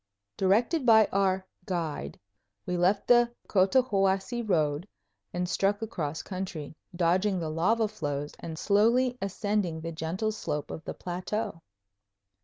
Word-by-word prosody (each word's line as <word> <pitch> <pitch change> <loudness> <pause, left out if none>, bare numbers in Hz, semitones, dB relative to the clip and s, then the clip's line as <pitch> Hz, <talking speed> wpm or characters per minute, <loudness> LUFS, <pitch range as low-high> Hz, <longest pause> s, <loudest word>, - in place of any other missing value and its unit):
Directed 230 - +2
by 220 -3 +7
our 190 -1 +1 0.2
"guide," 170 -5 -3 0.5
we 180 - -2
left 185 +3 +2
the 240 -1 +5 0.2
Cotahuasi 195 +1 +2
road 160 -5 0 0.4
and 180 0 -2
struck 195 +3 +1
across 160 -8 -3
country, 180 -6 -5 0.2
dodging 185 +3 +2
the 160 -2 -3
lava 215 +8 +2
flows 145 -8 -4
and 160 -1 -6
slowly 235 +7 +3
ascending 195 -3 -1
the 165 +1 -4
gentle 170 +7 -2
slope 150 -8 -4
of 160 - -7
the - - -5
plateau. 180 0 -4
190 Hz, 125 wpm, -28 LUFS, 165-215 Hz, 0.5 s, by